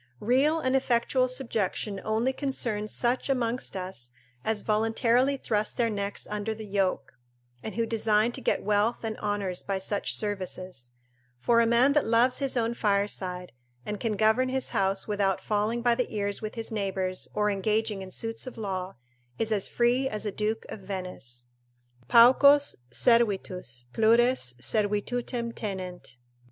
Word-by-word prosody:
Real 275 - +2
and 260 -3 0
effectual 255 0 +2
subjection 220 -6 -2
only 225 +4 0
concerns 235 -7 -2
such 245 +3 0
amongst 250 -4 -1
us 180 -10 -6 0.3
as 220 -2 -1
voluntarily 230 +5 +2
thrust 215 -4 -2
their 235 -2 +1
necks 200 -1 -3
under 210 +1 -3
the 220 0 -8
yoke, 195 -11 -2 0.4
and 220 - -6
who 230 0 0
design 220 0 +2
to 265 - -8
get - - 0
wealth 210 +4 +1
and 220 -1 -3
honours 205 -3 -2
by 195 -1 -2
such 200 +2 -1
services: 185 - -5 0.5
for 230 - +3
a 230 - +3
man 240 +4 +4
that 295 -4 +2
loves 235 +3 +3
his 275 -2 0
own 230 0 +1
fireside, 200 -4 -1 0.3
and 210 -1 -4
can 225 -3 -1
govern 220 +5 +3
his 260 0 -2
house 195 0 0
without 200 -3 0
falling 215 +3 -1
by 240 -1 +4
the 250 +1 -2
ears 205 -2 -2
with 215 -1 -5
his 225 -1 -4
neighbours 190 -3 -2
or 210 0 +2
engaging 210 +1 -1
in 190 - -8
suits 225 +6 -4
of 255 - -8
law, 190 -3 -4 0.4
is 225 0 -1
as 205 -3 0
free 245 +3 +1
as 215 -2 -4
a 210 - -1
Duke 215 +2 -2
of - - -7
Venice. 180 -11 -7 0.6
"Paucos 280 - +6
servitus, 185 - +2
plures 230 - +3
servitutem 230 - 0
tenent." 185 - -6
215 Hz, 155 wpm, -27 LUFS, 195-235 Hz, 0.6 s, Paucos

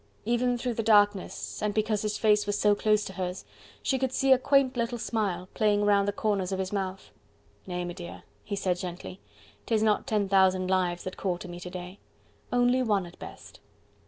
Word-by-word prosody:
Even 240 +2 +1
through 245 0 -2
the 225 - -2
darkness, 205 -3 +2
and 210 -1 -1
because 215 -1 +1
his 210 -1 -2
face 210 -1 +3
was 205 0 0
so 210 0 +4
close 210 0 +2
to 190 - -7
hers, 185 0 -4 0.4
she 265 - +1
could 260 -1 0
see 270 +1 +1
a 260 - +7
quaint 275 -1 +3
little 235 0 -1
smile 200 -6 -2
playing 205 -1 +2
round 200 -1 +3
the - - +2
corners 200 -2 -1
of 190 - -1
his 190 +1 -3
mouth. 190 - -4 0.6
"Nay, 180 -1 -3
m'dear," 175 0 -8 0.2
he 200 - -4
said 185 -2 0
gently, 180 +1 -7 0.5
"'tis 220 -2 +2
not 215 +3 +1
ten 210 -5 +1
thousand 190 -1 +3
lives 180 -2 0
that 185 - -6
call 185 -3 -1
to 180 - -9
me 175 0 -8
to 180 - -7
day... 180 +2 -8 0.5
only 245 +1 +3
one 205 -6 +1
at 175 - -14
best.... - - -11
205 Hz, 200 wpm, -28 LUFS, 185-220 Hz, 0.6 s, a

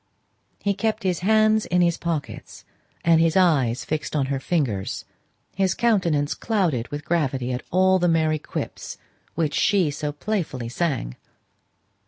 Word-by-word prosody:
He 200 - +2
kept 220 +1 -2
his 180 -3 0
hands 215 +2 +3
in 180 0 +2
his 170 -1 +2
pockets 165 -4 -5 0.4
and 165 -1 +5
his 165 +1 +2
eyes 135 -10 +2
fixed 155 0 -3
on 140 -3 +1
her 135 - -1
fingers; 130 - -2 0.5
his 190 -1 +1
countenance 180 -11 +1
clouded 175 - -1
with 145 +1 -6
gravity 135 -7 0
at 125 0 -3
all 185 +1 +3
the 175 - +2
merry 160 -2 +2
quips - - -6 0.4
which 155 -3 0
she 190 -7 +2
so 145 +1 -3
playfully 150 - -3
sang. 130 - -2
165 Hz, 145 wpm, -23 LUFS, 145-185 Hz, 0.5 s, and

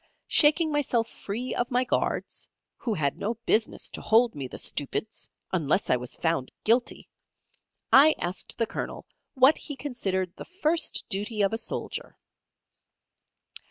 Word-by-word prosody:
Shaking 310 +1 +5
myself 255 -6 +1
free 235 +6 -5
of 245 0 -1
my 250 0 +2
guards 255 - -2 0.3
who 225 -4 -2
had 140 -5 -1
no 225 +3 -2
business 220 0 +1
to - - -6
hold 230 +2 +4
me, 140 -3 -5
the - - -9
stupids! 205 +9 -3 0.2
unless 170 +1 +1
I - - +5
was 125 0 -4
found 165 -6 -1
guilty 235 +3 +1 0.9
I 295 +4 +8
asked 180 +2 -3
the 230 - +1
Colonel - - -6 0.3
what 265 +4 +5
he 290 - -5
considered 195 -10 -2
the - - -8
first 340 -3 0
duty 210 +2 -1
of 195 - +1
a - - 0
soldier? 225 - -5
225 Hz, 145 wpm, -27 LUFS, 185-260 Hz, 0.9 s, I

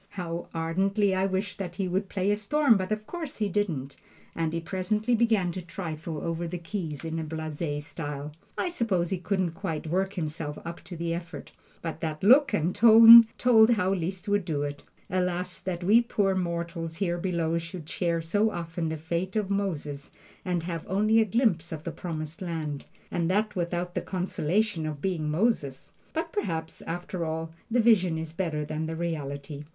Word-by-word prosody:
How 170 -1 -4
ardently 190 +5 +1
I 190 +1 +2
wished 190 +1 -3
that 180 -3 -4
he 190 0 -1
would 190 +2 -1
"play 195 +1 0
a - - +3
storm," 250 +4 +3
but 185 0 -2
of 215 0 -2
course 325 -2 -6
he 210 - 0
didn't, 170 -9 -2 0.4
and 165 -1 -1
he 165 - -1
presently 210 +7 -1
began 220 -6 +3
to 185 - -5
trifle 165 -3 -5
over 165 0 -2
the 180 +2 -4
keys 165 -4 -5
in 165 0 -2
a - - -2
blase 155 -1 -4
style. 145 -2 -5 0.3
I - - 0
suppose 200 - 0
he 190 - -1
couldn't 185 -1 0
quite 165 -3 -4
work 190 +4 0
himself 155 -3 -4
up 170 +1 -7
to 175 0 -8
the 170 0 -1
effort, 170 0 -7 0.3
but 165 -2 -4
that 155 0 -3
look 260 +8 +7
and 165 +3 +1
tone 230 0 +10
told 225 -3 +6
how 195 -5 +2
Liszt 185 +1 -3
would 205 -1 +2
do 155 -5 -1
it. 145 0 -4 0.3
Alas, 180 -1 -1
that 180 -1 -4
we 215 +6 +6
poor 205 -5 +1
mortals 170 -2 -3
here 175 0 -1
below 170 -2 0
should 170 -1 -8
share 170 -2 -1
so 205 +7 +2
often 165 -3 -3
the 160 - -3
fate 170 +5 -3
of 205 -2 0
Moses, 150 -8 -2 0.3
and 180 -3 -1
have 170 -1 -4
only 215 +4 +3
a - - +3
glimpse 205 -6 +1
of 155 -2 -5
the 170 - -4
Promised 160 -2 -6
Land, 160 -5 -4 0.2
and 170 -1 0
that 210 +3 +1
without 175 0 -2
the - - -1
consolation 185 0 -1
of 150 -2 -4
being 165 -3 -1
Moses! 150 - 0 0.2
But 325 +1 -3
perhaps, 165 - -3
after 175 +1 -3
all, 160 0 -3 0.2
the 240 +2 +2
vision 190 -8 +4
is 160 0 -5
better 160 -4 -2
than 155 +1 -3
the 160 - -4
reality. 145 -3 -4
175 Hz, 190 wpm, -28 LUFS, 160-200 Hz, 0.4 s, tone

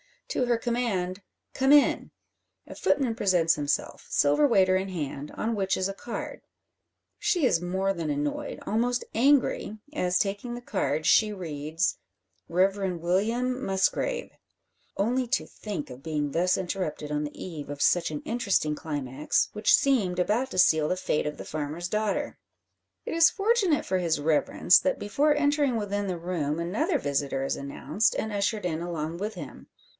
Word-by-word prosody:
To 260 - 0
her 240 -1 +2
command 220 -6 -2 0.3
"Come 265 +1 +2
in!" 290 -1 +4 0.6
a - - -10
footman 260 -5 +1
presents 180 -6 +3
himself, 145 -1 -2
silver 145 - +3
waiter 190 -6 +4
in 190 +1 -2
hand, 150 -5 -5
on 225 +1 -2
which 195 -2 0
is 190 +1 -1
a - - -3
card. 235 +4 -6 0.8
She 410 -7 +1
is 170 -9 +2
more 190 +2 0
than 165 -4 -4
annoyed, 145 0 -3
almost 240 +3 0
angry, 250 -4 +2 0.2
as 180 -10 +1
taking 205 +5 -2
the 240 - -7
card, 155 -9 -1
she 210 +5 +4
reads 160 -1 -2 0.5
"Reverend 185 0 +1
William 230 +9 0
Musgrave." 195 - 0 0.6
Only 245 +5 0
to 260 - 0
think 205 -8 -6
of 125 +1 -10
being 150 -2 -2
thus 180 +4 +2
interrupted 175 -5 -3
on 150 0 -1
the 145 - -9
eve 160 -6 -7
of 145 0 -6
such 175 - +3
an 150 -1 -5
interesting 205 -10 0
climax, 145 -2 -1
which 210 - +4
seemed 215 -11 +1
about 215 +8 +1
to - - -5
seal 160 -4 +4
the 180 - -1
fate 150 -4 -1
of 150 - -4
the - - -8
farmer's 155 +3 -4
daughter. 215 +8 -1 0.7
It - - -4
is 330 0 +6
fortunate 400 -7 +1
for 185 - 0
his 165 -4 0
Reverence, 160 +3 +4
that 280 - 0
before 290 +9 +1
entering 290 -3 +2
within 205 -2 -2
the 180 -2 -2
room 165 -4 -2
another 220 - 0
visitor 140 - -1
is 135 - -1
announced, 140 +9 -1
and 220 - -2
ushered 205 0 -1
in 165 -2 -2
along 165 -1 -4
with 210 +4 -3
him. - - -9
190 Hz, 165 wpm, -27 LUFS, 160-235 Hz, 0.8 s, is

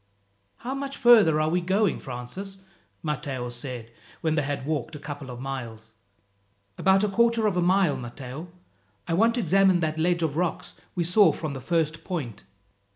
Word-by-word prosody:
"How 250 +3 -5
much 275 0 -5
further 215 -11 +6
are 155 0 +2
we 180 +2 +1
going, 190 +2 +1
Francis?" 135 +11 -7 0.5
Matteo 140 -5 -3
said 120 -1 -6 0.3
when 160 -1 +1
they 155 - +2
had 140 -1 -3
walked 155 +1 -2
a - - -7
couple 145 -2 -7
of 120 -1 -7
miles. 115 -4 -6 0.8
"About 190 - +3
a - - +3
quarter 230 +2 +2
of 205 -3 +1
a 180 - +2
mile, 180 -5 +3
Matteo. 130 +5 -7 0.6
I - - -1
want 225 +6 +3
to 245 - 0
examine 190 0 +4
that 155 0 -1
ledge 170 +1 +1
of 155 -2 -1
rocks 175 -1 -2 0.2
we 175 - +1
saw 185 +5 +5
from 155 -3 -5
the 135 - -6
first 165 0 -1
point." 140 - -5
160 Hz, 175 wpm, -26 LUFS, 135-190 Hz, 0.8 s, further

